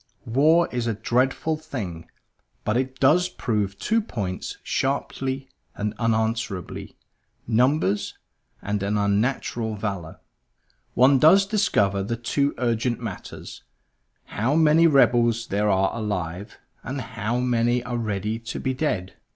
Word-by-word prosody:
War 155 Hz, +8 st, +4 dB
is 120 Hz, -1 st, -2 dB
a 115 Hz, -, 0 dB
dreadful 130 Hz, +8 st, 0 dB
thing; 105 Hz, -, -6 dB, 0.6 s
but 105 Hz, -, +1 dB
it 130 Hz, +1 st, -2 dB
does 175 Hz, +7 st, +4 dB
prove 105 Hz, -, -2 dB
two 225 Hz, -, +1 dB
points 100 Hz, -, -5 dB
sharply 135 Hz, 0 st, -2 dB, 0.3 s
and 105 Hz, +1 st, -2 dB
unanswerably 110 Hz, -4 st, -2 dB, 0.5 s
numbers, 120 Hz, -3 st, +1 dB, 0.5 s
and 105 Hz, 0 st, -2 dB
an 100 Hz, +1 st, 0 dB
unnatural 110 Hz, +2 st, 0 dB
valor. 100 Hz, -6 st, -5 dB, 0.8 s
One 130 Hz, +2 st, +5 dB
does 190 Hz, +7 st, +6 dB
discover 105 Hz, -, +1 dB
the 115 Hz, +4 st, -3 dB
two 140 Hz, +5 st, 0 dB
urgent 120 Hz, 0 st, 0 dB
matters; -, -, -8 dB, 0.6 s
how 120 Hz, +8 st, -1 dB
many 160 Hz, +1 st, +5 dB
rebels 120 Hz, -5 st, +3 dB
there 105 Hz, 0 st, 0 dB
are 95 Hz, -1 st, +2 dB
alive, 100 Hz, -3 st, -4 dB, 0.2 s
and 135 Hz, +3 st, -5 dB
how 115 Hz, -1 st, -3 dB
many 120 Hz, -1 st, +1 dB
are 120 Hz, -1 st, -3 dB
ready 110 Hz, 0 st, -2 dB
to 115 Hz, -, -6 dB
be 130 Hz, -, -1 dB
dead. 110 Hz, -10 st, -2 dB
115 Hz, 125 wpm, -24 LUFS, 105-135 Hz, 0.8 s, does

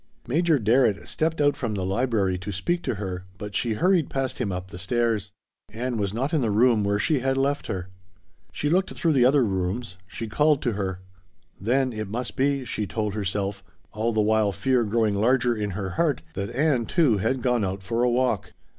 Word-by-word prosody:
Major 160 Hz, +4 st, +2 dB
Darrett 115 Hz, -2 st, +2 dB
stepped 160 Hz, +1 st, -1 dB
out 145 Hz, -1 st, +3 dB
from 115 Hz, -5 st, -3 dB
the 95 Hz, -2 st, -2 dB
library 100 Hz, -3 st, 0 dB
to 95 Hz, +3 st, -5 dB
speak 170 Hz, -, -1 dB
to -, -, -2 dB
her, 95 Hz, -2 st, -5 dB
but 105 Hz, +1 st, -7 dB
she 115 Hz, 0 st, 0 dB
hurried 175 Hz, -, +2 dB
past 135 Hz, -1 st, -2 dB
him 110 Hz, -6 st, -1 dB
up 90 Hz, +1 st, -5 dB
the 90 Hz, -, -8 dB
stairs. 110 Hz, 0 st, 0 dB, 0.4 s
Ann 120 Hz, +2 st, -3 dB
was 100 Hz, -2 st, 0 dB
not 130 Hz, +8 st, -2 dB
in 155 Hz, -, +2 dB
the 115 Hz, -, +1 dB
room 110 Hz, +1 st, +4 dB
where 100 Hz, 0 st, +1 dB
she 150 Hz, +7 st, +1 dB
had 135 Hz, +1 st, 0 dB
left 140 Hz, +2 st, 0 dB
her. 90 Hz, -1 st, -4 dB, 0.6 s
She 150 Hz, -, -2 dB
looked 185 Hz, +5 st, +2 dB
through 165 Hz, -2 st, +1 dB
the 125 Hz, -3 st, +4 dB
other 135 Hz, 0 st, +4 dB
rooms. 95 Hz, +1 st, -3 dB
She 115 Hz, +6 st, -6 dB
called 150 Hz, +6 st, +2 dB
to 120 Hz, -, +1 dB
her. 95 Hz, -3 st, -3 dB, 0.6 s
Then 125 Hz, +5 st, +1 dB
it 110 Hz, -1 st, -4 dB
must 115 Hz, +4 st, -4 dB
be 140 Hz, 0 st, +1 dB
she 105 Hz, -3 st, -3 dB
told 105 Hz, -1 st, -2 dB
herself 100 Hz, -1 st, -2 dB, 0.3 s
all 110 Hz, +3 st, -1 dB
the 110 Hz, -1 st, +1 dB
while 110 Hz, -1 st, +2 dB
fear 120 Hz, +6 st, +1 dB
growing 110 Hz, -1 st, +1 dB
larger 120 Hz, +3 st, +2 dB
in 105 Hz, -2 st, -2 dB
her 95 Hz, -2 st, -3 dB
heart 145 Hz, -, 0 dB
that 100 Hz, +2 st, -3 dB
Ann, 130 Hz, -3 st, +1 dB
too, 140 Hz, -, +3 dB
had 120 Hz, +5 st, -1 dB
gone 125 Hz, -4 st, +2 dB
out 95 Hz, 0 st, -3 dB
for 115 Hz, +4 st, -1 dB
a 125 Hz, -, +3 dB
walk. 120 Hz, -5 st, 0 dB
115 Hz, 210 wpm, -25 LUFS, 100-130 Hz, 0.6 s, room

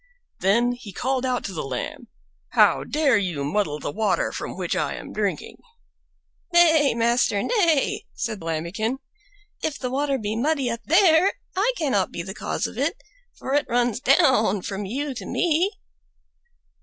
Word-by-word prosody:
Then 235 Hz, +6 st, +3 dB
he 245 Hz, -4 st, -8 dB
called 260 Hz, +6 st, -1 dB
out 250 Hz, -1 st, -1 dB
to 195 Hz, -, -5 dB
the 160 Hz, -, -3 dB
Lamb, 130 Hz, -3 st, -5 dB, 0.5 s
"How -, -, +4 dB
dare 290 Hz, -7 st, +2 dB
you 175 Hz, -8 st, -2 dB
muddle 150 Hz, -1 st, -1 dB
the 145 Hz, -, -4 dB
water 215 Hz, +5 st, 0 dB
from -, -, -6 dB
which -, -, -2 dB
I -, -, -1 dB
am -, -, -9 dB
drinking?" -, -, -3 dB, 0.9 s
"Nay, 320 Hz, -6 st, +5 dB
master, 235 Hz, -3 st, +2 dB
nay," 340 Hz, -, +1 dB
said 220 Hz, -4 st, -4 dB
Lambikin; 170 Hz, +10 st, -2 dB, 0.6 s
"if 310 Hz, -2 st, -2 dB
the 250 Hz, -2 st, -4 dB
water 275 Hz, +1 st, 0 dB
be 215 Hz, -2 st, -3 dB
muddy 270 Hz, 0 st, 0 dB
up 230 Hz, -, -5 dB
there, 345 Hz, +2 st, +5 dB, 0.2 s
I 410 Hz, +6 st, +2 dB
cannot 260 Hz, -, 0 dB
be 170 Hz, -, -5 dB
the 190 Hz, +2 st, -7 dB
cause -, -, -3 dB
of -, -, -6 dB
it, -, -, 0 dB, 0.4 s
for 265 Hz, -, -5 dB
it 290 Hz, 0 st, +2 dB
runs 240 Hz, -2 st, +1 dB
down 225 Hz, -8 st, +3 dB
from 200 Hz, 0 st, -4 dB
you 275 Hz, +7 st, -3 dB
to 250 Hz, -, -7 dB
me." 350 Hz, +3 st, +1 dB
245 Hz, 160 wpm, -24 LUFS, 200-290 Hz, 0.9 s, Nay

